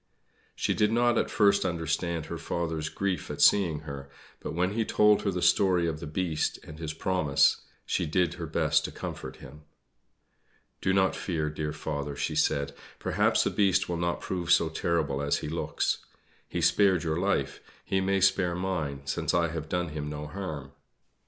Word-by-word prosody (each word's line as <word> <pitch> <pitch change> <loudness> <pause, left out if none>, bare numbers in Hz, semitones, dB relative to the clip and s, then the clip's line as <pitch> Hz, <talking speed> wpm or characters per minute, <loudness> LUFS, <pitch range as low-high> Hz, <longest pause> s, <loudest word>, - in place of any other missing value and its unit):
She - - 0
did 105 0 +2
not 120 +1 +3
at - - -1
first 100 -1 +3
understand 85 -1 -1
her 85 0 -6
father's 80 -2 -2
grief 95 +1 -2
at - - -5
seeing 85 -7 +4
her; 70 -2 -8 0.3
but - - -6
when 90 +2 +1
he 115 +1 +1
told 105 -1 +4
her 100 - 0
the 90 -2 -2
story 90 0 +4
of 80 -2 -2
the 85 - -6
Beast 80 0 -1
and 80 0 -11
his 80 -2 -3
promise 80 -3 +2 0.2
she - - -1
did 90 +2 +1
her - - -6
best - - +2
to - - -4
comfort - - -6
him. 75 +4 -13 1.2
"Do 95 - +1
not 95 0 +3
fear, 80 -5 -2
dear 75 0 -3
father," 75 -2 -4
she - - -2
said, 70 0 +1 0.2
"perhaps - - +2
the - - 0
Beast 100 -3 +2
will 85 - -2
not 85 0 -1
prove 90 -2 -3
so 80 - +5
terrible 80 -4 -1
as 70 0 +1
he - - -5
looks. 80 +3 -1 0.5
He - - -2
spared 95 -5 +4
your 80 -1 -1
life; 100 +2 0 0.3
he 95 - +1
may 95 0 +1
spare 95 -2 +3
mine, 80 -7 -3
since 70 - -1
I 85 -1 +2
have 80 -1 -5
done 90 -1 -1
him 75 -1 -4
no 75 0 -5
harm." 75 -5 -6
85 Hz, 185 wpm, -28 LUFS, 75-95 Hz, 1.2 s, so